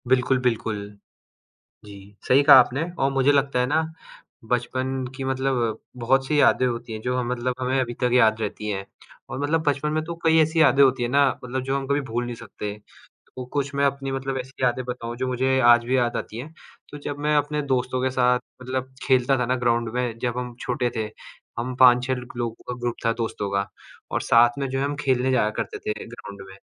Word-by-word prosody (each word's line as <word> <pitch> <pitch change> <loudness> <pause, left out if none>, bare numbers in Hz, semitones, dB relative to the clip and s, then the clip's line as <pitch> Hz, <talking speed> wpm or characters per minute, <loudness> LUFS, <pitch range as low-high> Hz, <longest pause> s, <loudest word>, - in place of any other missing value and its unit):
बिल्कुल, 130 +1 +2
बिल्कुल। 115 -3 -1 1.1
जी, 100 0 -13
सही 135 +3 +6
कहा 140 - +9
आपने 130 +3 +3 0.2
और 135 - +2
मुझे 135 +1 +3
लगता 140 -2 +1
है 125 - +2
ना, 150 +5 +2 0.7
बचपन 130 +2 -1
की 135 - -5
मतलब 130 -4 -1 0.2
बहुत-सी 135 +4 +2
यादें 130 - +4
होती 120 -2 -4
हैं, 110 - -5
जो 125 +1 -1
ह - - +1
मतलब 125 0 -1
हमें 130 +1 0
अभी 120 -2 -2
तक 125 - +3
याद 110 -3 +4
रहती 105 0 -4
हैं। 95 -1 -3 0.5
और - - -4
मतलब 160 +3 +1
बचपन 145 +1 0
में 155 0 0
तो 170 +1 -5
कई 160 0 +5
ऐसी 160 +1 0
यादें 140 -1 +5
होती 130 -2 +3
हैं 120 - -1
ना, 140 +1 +4 0.2
मतलब 130 +1 -3
जो 135 +1 -1
हम 135 -1 -3
कभी 140 +1 +1
भूल 120 -2 -3
नहीं 120 0 -5
सकते। 105 -2 -7 0.6
तो 130 - -5
कुछ 140 -1 -2
मैं 140 0 +1
अपनी 135 -1 -1
मतलब 135 0 -3
ऐसी 130 +1 -8
यादें 125 +1 +1
बताऊँ 120 -1 -5
जो 130 +1 -2
मुझे 130 +1 +1
आज 120 -1 +6
भी 130 +2 +1
याद 120 -2 +1
आती 110 - -5
हैं, 150 +6 -8 0.4
तो 145 - -8
जब 145 0 -5
मैं 150 +1 +1
अपने 150 +1 0
दोस्तों 130 -2 -1
के 130 - +1
साथ 125 -1 +3 0.2
मतलब 130 +1 -4
खेलता 130 0 +3
था 125 - 0
ना 130 +2 +1
ग्राउंड 120 -2 +1
में, 125 -2 -2
जब 120 0 -2
हम 125 -1 -5
छोटे 125 -1 -1
थे, 110 -1 -2 0.5
हम 125 +2 -3
5-6 125 +1 +6
लग 125 -1 -8
लोगों 120 -2 -2
का 125 - -2
ग्रुप 120 -1 -1
था 115 - +3
दोस्तों 105 -3 -3
का, 100 0 -1 0.4
और - - -1
साथ 120 +2 +4
में 140 -1 -2
जो 135 +1 -2
है 135 - 0
हम 145 +1 -1
खेलने 130 -2 +1
जाया 110 -4 +2
करते - - -5
थे - - -3
ग्राउंड 100 -4 -10
में। 95 - -12
125 Hz, 220 wpm, -24 LUFS, 120-135 Hz, 1.1 s, कहा